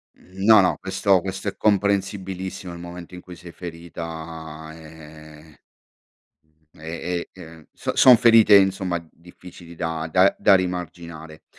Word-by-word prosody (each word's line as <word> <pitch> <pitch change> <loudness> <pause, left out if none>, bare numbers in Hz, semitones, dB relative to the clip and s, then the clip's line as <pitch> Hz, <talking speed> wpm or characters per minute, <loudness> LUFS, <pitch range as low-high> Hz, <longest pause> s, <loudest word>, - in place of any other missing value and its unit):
Mh, 95 +2 -11
no, 110 0 +7
no. 90 - +1
Questo 95 0 +1
questo 95 +2 -6
è 100 - -3
comprensibilissimo. 95 -2 -2
Nel 85 0 -10
momento 85 0 -10
in 90 - -10
cui 90 -1 -12
sei 85 0 -13
ferita, 80 -2 -9
ehm, 80 -1 -15 1.2
mhmm, - - -21
e 85 +2 -5
e 95 - -16
ehm, 80 -1 -14
so - - -5
son 125 -2 +8
ferite, 115 -2 +5
insomma, 95 -3 +1
difficili 85 0 -15
da 80 -1 -4
da 95 +4 +4
da - - +5
rimarginare. 85 -3 -5
90 Hz, 140 wpm, -22 LUFS, 80-95 Hz, 1.2 s, son